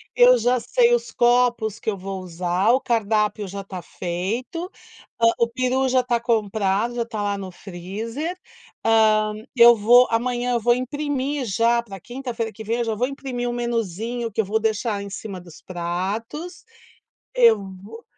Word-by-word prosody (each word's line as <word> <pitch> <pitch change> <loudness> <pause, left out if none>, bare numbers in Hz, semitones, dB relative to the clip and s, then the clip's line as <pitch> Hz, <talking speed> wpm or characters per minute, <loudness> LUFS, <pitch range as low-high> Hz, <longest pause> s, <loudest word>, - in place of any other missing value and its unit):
eu - - +7
já 250 - +2
sei 485 - +3
os 480 - 0
copos 240 -3 +2
que - - -2
eu 200 - -2
vou 190 0 -6
usar, 180 +3 -1
o 260 - +4
cardápio 215 -3 0
já 200 +1 -6
tá 185 -2 -7
feito, 225 - -4 0.5
hã, 230 - +4
o 235 - +3
peru 255 +2 0
já 255 0 +3
tá 240 -1 0
comprado, 220 -1 0
já 235 - 0
tá 215 -3 -4
lá 205 0 0
no 195 -1 -6
freezer, 215 - -6 0.5
hã, 215 -1 +4 0.2
eu 235 0 +8
vou 240 +4 +6
amanhã 245 +1 0
eu 235 - +2
vou 240 +2 +3
imprimir, 280 +1 -2
já 230 +3 +2
pra 200 -5 -10
quinta-feira 240 0 -5
que 220 - -9
vem, 230 +2 -1
já 225 -1 -1
vou 245 +4 0
imprimir 260 -3 -4
um - - -3
menuzinho 230 0 -3
que 215 - -7
eu 220 - +3
vou 215 +3 0
deixar 220 -1 -1
em 200 - -7
cima 195 -2 -7
dos 175 0 -15
pratos, 200 - -4 0.7
eu 230 -3 +6 0.2
vou 225 +3 -11
230 Hz, 170 wpm, -22 LUFS, 200-245 Hz, 0.7 s, eu